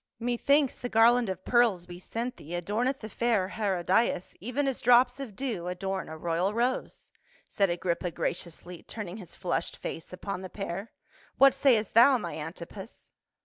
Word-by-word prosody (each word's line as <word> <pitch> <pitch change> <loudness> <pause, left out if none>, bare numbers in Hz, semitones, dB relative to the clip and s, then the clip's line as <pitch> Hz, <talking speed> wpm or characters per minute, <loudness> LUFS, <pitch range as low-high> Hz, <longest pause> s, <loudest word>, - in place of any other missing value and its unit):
" - - -57
Methinks 280 +3 +2
the 245 - -4
garland 230 0 +5
of 185 0 -5
pearls 225 -8 +3
we 175 0 -9
sent 235 +6 -4
thee 165 +4 -7
adorneth 220 +10 -1
the 215 - -6
fair 220 -4 0
Herodias 190 -1 0
even 250 +7 -1
as 270 - -2
drops 245 +2 +5
of 250 -8 -7
dew 220 -10 -3
adorn 190 +1 -3
a 160 - -7
royal 175 +5 -1
rose," 245 +2 -2 0.4
said 195 -2 +1
Agrippa 175 +1 -1
graciously, 170 +1 -5
turning 205 -3 -7
his 185 -6 -11
flushed 175 -2 -2
face 165 - -6
upon 185 +1 -5
the 185 - -7
pair, 195 +2 -5 0.2
" - - -29
What 275 -1 +7
sayest 250 -6 +2
thou, 250 +4 +7
my 230 - -5
Antipas?" 170 +6 -9
205 Hz, 170 wpm, -29 LUFS, 180-240 Hz, 0.4 s, What